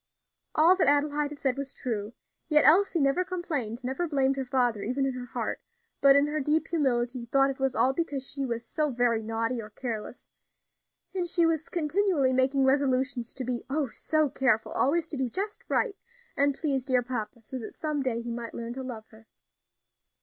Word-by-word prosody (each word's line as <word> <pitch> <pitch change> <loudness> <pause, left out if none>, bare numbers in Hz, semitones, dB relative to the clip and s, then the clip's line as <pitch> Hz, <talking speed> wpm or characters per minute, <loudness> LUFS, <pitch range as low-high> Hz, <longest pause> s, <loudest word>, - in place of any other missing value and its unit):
All 330 +4 +6
that - - +2
Adelaide 290 +1 +2
had 295 - -9
said 270 -2 -1
was 275 -1 -5
true; 220 -3 -4 0.4
yet 300 -1 +5
Elsie 355 +2 +5
never 275 +5 +2
complained, 305 - -3
never 265 +8 -2
blamed 275 -3 +2
her 270 -1 -3
father, 245 -4 +1
even 255 +6 -1
in 270 - -1
her 250 0 -7
heart; - - -3 0.4
but, 275 0 +7
in 280 +1 +5
her 300 +1 -2
deep 300 +3 +1
humility, 245 -6 0
thought 275 +2 +3
it 270 - -9
was 265 -1 0
all 265 - +3
because 285 -4 -2
she 280 -1 -3
was 235 -2 -3
"so 300 +5 -1
very 240 -3 +1
naughty 225 +2 -2
or 210 - -10
careless;" 220 -1 -6 0.8
and 360 -2 -1
she 340 -1 +3
was 325 -1 0
continually 330 -4 +1
making 265 +1 +3
resolutions 260 -3 +1
to 260 - -4
be 250 -1 -3
"oh! 280 -1 0
so 310 +5 0
careful 260 -5 +1
always 325 +5 +2
to 315 -3 -6
do 260 -2 -1
just 405 - -4
right, 455 -5 +1 0.4
and 280 0 +2
please 275 -5 -1
dear 255 -2 +2
papa, 235 -1 -5
so 260 +4 -6
that 225 - -8
some 305 -2 -2
day 235 -3 -1
he 235 - -5
might 230 0 -6
learn 235 0 -5
to 265 - -6
love 240 -4 -7
her." 220 0 -18
270 Hz, 195 wpm, -28 LUFS, 245-300 Hz, 0.8 s, but